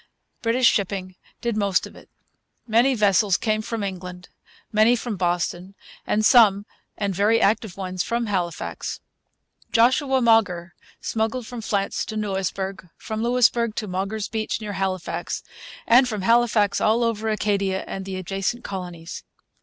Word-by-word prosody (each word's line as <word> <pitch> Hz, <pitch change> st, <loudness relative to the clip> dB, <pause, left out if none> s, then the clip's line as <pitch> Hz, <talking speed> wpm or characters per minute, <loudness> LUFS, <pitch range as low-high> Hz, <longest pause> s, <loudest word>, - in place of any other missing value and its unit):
British 240 Hz, +2 st, +2 dB
shipping 195 Hz, -3 st, +1 dB, 0.3 s
did 235 Hz, -2 st, -1 dB
most 200 Hz, -3 st, +1 dB
of -, -, -12 dB
it. -, -, -16 dB, 0.6 s
Many 240 Hz, +4 st, +3 dB
vessels 205 Hz, -2 st, +3 dB
came 215 Hz, -1 st, 0 dB
from 220 Hz, 0 st, -4 dB
England, 180 Hz, -2 st, -6 dB, 0.4 s
many 220 Hz, +2 st, +5 dB
from 235 Hz, -2 st, -4 dB
Boston, 175 Hz, +1 st, -2 dB, 0.5 s
some, 215 Hz, -4 st, +5 dB, 0.3 s
and 200 Hz, -2 st, -1 dB
very 210 Hz, +5 st, +3 dB
active 205 Hz, -2 st, +1 dB
ones, 185 Hz, -1 st, -3 dB
from 235 Hz, +4 st, -1 dB
Halifax. 180 Hz, -5 st, -3 dB, 0.7 s
Joshua 260 Hz, +3 st, +3 dB
Mauger 205 Hz, -8 st, +2 dB, 0.3 s
smuggled 225 Hz, +2 st, -2 dB
from 245 Hz, 0 st, -7 dB
France 200 Hz, -2 st, -1 dB
to 220 Hz, -, -6 dB
Louisbourg, 195 Hz, -2 st, -3 dB
from 220 Hz, 0 st, -5 dB
Louisbourg 235 Hz, -1 st, +2 dB
to 220 Hz, -, -2 dB
'Mauger's 195 Hz, +3 st, -3 dB
Beach' 220 Hz, -2 st, -2 dB
near 210 Hz, -2 st, -5 dB
Halifax, 190 Hz, -2 st, -3 dB, 0.4 s
and 250 Hz, +2 st, +6 dB
from 210 Hz, -4 st, -3 dB
Halifax 230 Hz, -2 st, +3 dB
all 225 Hz, +3 st, +3 dB
over 225 Hz, -1 st, -1 dB
Acadia 200 Hz, -3 st, 0 dB
and 195 Hz, -, -5 dB
the 190 Hz, 0 st, -5 dB
adjacent 195 Hz, +6 st, -3 dB
colonies. 175 Hz, -3 st, -7 dB
210 Hz, 140 wpm, -23 LUFS, 190-230 Hz, 0.7 s, and